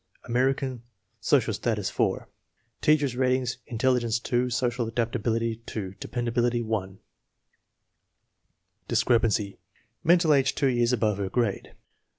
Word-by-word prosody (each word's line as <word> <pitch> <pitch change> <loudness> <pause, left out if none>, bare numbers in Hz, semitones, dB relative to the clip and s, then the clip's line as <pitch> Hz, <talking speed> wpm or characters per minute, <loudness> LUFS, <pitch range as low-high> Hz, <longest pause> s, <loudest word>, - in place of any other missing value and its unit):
American, 130 0 0 0.4
social - - +2
status - - -1
4. - - -1 0.5
Teacher's 145 -4 +3
ratings: 130 -1 0
intelligence 120 -1 +1
2, 125 +1 0
social 120 -1 -1
adaptability 115 0 -1
2, 95 -4 -5
de - - -6
pendability 120 -1 0
1. 95 -4 -3 1.9
Discrepancy: 110 -4 +1 0.4
Mental 170 -1 +4
age 135 -1 +2
two 140 - +2
years 120 -1 +2
above 105 -4 +1
her 95 -1 -2
grade. 115 -1 -2
120 Hz, 110 wpm, -26 LUFS, 115-130 Hz, 1.9 s, Mental